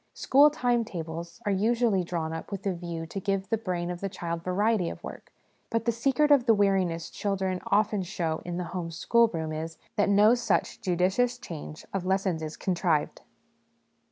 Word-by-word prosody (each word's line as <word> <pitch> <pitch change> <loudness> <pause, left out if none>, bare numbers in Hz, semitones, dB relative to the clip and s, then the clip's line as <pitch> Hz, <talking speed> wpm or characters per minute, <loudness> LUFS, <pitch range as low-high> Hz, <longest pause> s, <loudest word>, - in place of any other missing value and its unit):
School 285 +3 +5
time 245 -5 +1
tables 170 -4 -6
are 205 - +1
usually 215 0 +2
drawn 165 -2 -3
up 165 - -7
with 200 -1 -5
a 195 - +1
view 170 -2 -5
to 180 +4 -5
give 195 0 -2
the 225 - +3
brain 180 -4 -2
of 175 - -6
the 195 - -2
child 170 -3 -4
variety 190 0 +1
of - - -9
work; - - -9 0.4
but 230 -1 -1
the 235 - +3
secret 275 +6 +2
of 265 -4 +5
the 225 - +6
weariness 190 -5 +1
children 190 -2 -2
often 210 0 +2
show 170 -4 -2
in 175 0 -4
the 180 - -2
home 175 -3 -3
schoolroom 165 -2 +1
is, 160 +1 -5 0.2
that 205 0 +3
no 205 +3 +6
such 240 -1 0
judicious 190 +6 +1
change 155 -9 -8
of 195 -2 -1
lessons 190 -3 +1
is 155 0 -5
contrived. 170 -5 0
190 Hz, 185 wpm, -28 LUFS, 170-220 Hz, 0.4 s, the